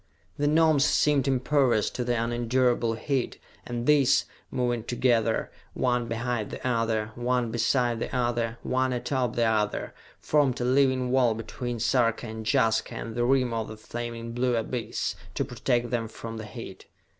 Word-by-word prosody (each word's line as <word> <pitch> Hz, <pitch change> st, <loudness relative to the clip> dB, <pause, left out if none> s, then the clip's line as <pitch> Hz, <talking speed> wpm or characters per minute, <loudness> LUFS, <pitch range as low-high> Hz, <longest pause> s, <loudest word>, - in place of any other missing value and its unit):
The 145 Hz, -, 0 dB
Gnomes 155 Hz, -2 st, +4 dB
seemed 145 Hz, -2 st, +3 dB
impervious 130 Hz, -4 st, +2 dB
to 125 Hz, -, -3 dB
the 120 Hz, -1 st, 0 dB
unendurable 120 Hz, 0 st, +1 dB
heat, 130 Hz, +2 st, -2 dB, 0.3 s
and 120 Hz, 0 st, -3 dB
these, 145 Hz, -3 st, +4 dB, 0.2 s
moving 120 Hz, -2 st, -1 dB
together, 120 Hz, -2 st, +1 dB, 0.2 s
one 125 Hz, -2 st, +1 dB
behind 115 Hz, -1 st, -2 dB
the -, -, -5 dB
other, 115 Hz, -3 st, 0 dB
one 120 Hz, 0 st, 0 dB
beside 120 Hz, +1 st, +1 dB
the 130 Hz, -, -4 dB
other, 120 Hz, -2 st, 0 dB
one 130 Hz, 0 st, 0 dB
atop 125 Hz, -1 st, -1 dB
the 120 Hz, -, +2 dB
other, 110 Hz, -2 st, 0 dB, 0.3 s
formed 145 Hz, -5 st, +2 dB
a 120 Hz, -, -1 dB
living 130 Hz, -1 st, +2 dB
wall 125 Hz, -4 st, +3 dB
between 120 Hz, +1 st, -5 dB
Sarka 120 Hz, 0 st, +1 dB
and 110 Hz, -1 st, -6 dB
Jaska 115 Hz, -5 st, +1 dB
and 115 Hz, -, -5 dB
the 120 Hz, +1 st, 0 dB
rim 130 Hz, -2 st, +2 dB
of 115 Hz, -1 st, -2 dB
the 110 Hz, -, -8 dB
flaming 115 Hz, +1 st, -6 dB
blue 125 Hz, +1 st, +1 dB
abyss, 115 Hz, 0 st, -2 dB, 0.2 s
to -, -, 0 dB
protect 120 Hz, 0 st, -1 dB
them 115 Hz, -2 st, -1 dB
from 115 Hz, +1 st, -8 dB
the 110 Hz, -, -6 dB
heat. 105 Hz, -4 st, -9 dB
120 Hz, 160 wpm, -27 LUFS, 115-130 Hz, 0.3 s, Gnomes